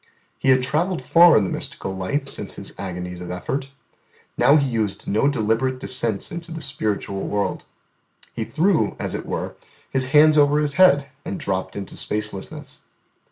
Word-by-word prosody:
He 135 Hz, -, +1 dB
had 130 Hz, -1 st, +5 dB
travelled 170 Hz, +7 st, 0 dB
far 170 Hz, 0 st, +7 dB
in 105 Hz, -, +3 dB
the 95 Hz, -, -2 dB
mystical 95 Hz, -, -3 dB
life 135 Hz, +10 st, -2 dB
since -, -, -4 dB
His -, -, -3 dB
agonies 90 Hz, -2 st, -5 dB
of 90 Hz, -, -7 dB
effort. 135 Hz, +10 st, -3 dB, 0.7 s
Now 145 Hz, -, +5 dB
He 140 Hz, -3 st, +3 dB
used 110 Hz, -5 st, -2 dB
no 110 Hz, +7 st, +2 dB
deliberate 130 Hz, 0 st, 0 dB
descents 120 Hz, -6 st, -2 dB
into 170 Hz, 0 st, -7 dB
the 165 Hz, -, -5 dB
spiritual 105 Hz, -9 st, -2 dB
world: 100 Hz, -1 st, -2 dB, 0.7 s
He -, -, -3 dB
threw, 170 Hz, +3 st, +1 dB
as -, -, -3 dB
it -, -, -5 dB
were, -, -, -3 dB, 0.4 s
His 130 Hz, -1 st, 0 dB
hands 150 Hz, +2 st, +6 dB
over 145 Hz, +1 st, +4 dB
His 150 Hz, -1 st, 0 dB
head, 145 Hz, -6 st, +4 dB
and 100 Hz, -, -5 dB
dropped 95 Hz, -1 st, -3 dB
into 100 Hz, -2 st, -7 dB
spacelessness. 105 Hz, -2 st, -4 dB
130 Hz, 165 wpm, -22 LUFS, 100-150 Hz, 0.7 s, far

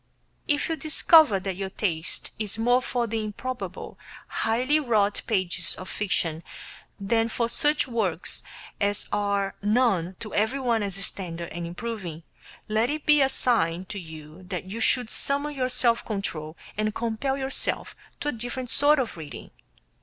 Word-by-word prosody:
If 290 Hz, -3 st, +1 dB
you 325 Hz, -, -1 dB
discover 310 Hz, -, +5 dB
that 190 Hz, -1 st, -3 dB
your 195 Hz, -1 st, -3 dB
taste 170 Hz, -5 st, -2 dB
is 210 Hz, -1 st, -1 dB
more 245 Hz, +3 st, +3 dB
for 245 Hz, -2 st, -1 dB
the 225 Hz, -1 st, -2 dB
improbable 250 Hz, +4 st, -5 dB, 0.3 s
highly 250 Hz, +7 st, +1 dB
wrought 215 Hz, -7 st, +1 dB
pages 185 Hz, -4 st, 0 dB
of 185 Hz, -, -8 dB
fiction 165 Hz, -5 st, 0 dB, 0.6 s
than 225 Hz, +3 st, +1 dB
for 235 Hz, +1 st, 0 dB
such 295 Hz, +5 st, +2 dB
works 210 Hz, -9 st, 0 dB, 0.4 s
as 205 Hz, 0 st, 0 dB
are 200 Hz, -1 st, 0 dB
known 205 Hz, -5 st, +2 dB
to 215 Hz, -2 st, -6 dB
everyone 235 Hz, +1 st, +1 dB
as 200 Hz, -3 st, 0 dB
standard 175 Hz, -3 st, -2 dB
and 170 Hz, 0 st, -5 dB
improving, 175 Hz, -4 st, -5 dB, 0.4 s
let 220 Hz, +2 st, +1 dB
it 300 Hz, 0 st, -3 dB
be 300 Hz, -1 st, +6 dB
a 270 Hz, -, +4 dB
sign 190 Hz, -10 st, +1 dB
to 205 Hz, -, -4 dB
you 160 Hz, 0 st, -11 dB
that 180 Hz, -1 st, -4 dB
you 200 Hz, +5 st, -6 dB
should 235 Hz, 0 st, +3 dB
summon 285 Hz, +2 st, +1 dB
your 255 Hz, -2 st, -1 dB
self 240 Hz, -2 st, +4 dB
control 165 Hz, -7 st, -4 dB, 0.2 s
and 215 Hz, 0 st, 0 dB
compel 235 Hz, +4 st, -1 dB
yourself 270 Hz, 0 st, -1 dB, 0.3 s
to 295 Hz, -, 0 dB
a -, -, +1 dB
different 245 Hz, +1 st, -4 dB
sort 295 Hz, +1 st, +5 dB
of 255 Hz, -9 st, -2 dB
reading. 155 Hz, -3 st, -9 dB
220 Hz, 155 wpm, -26 LUFS, 190-250 Hz, 0.6 s, be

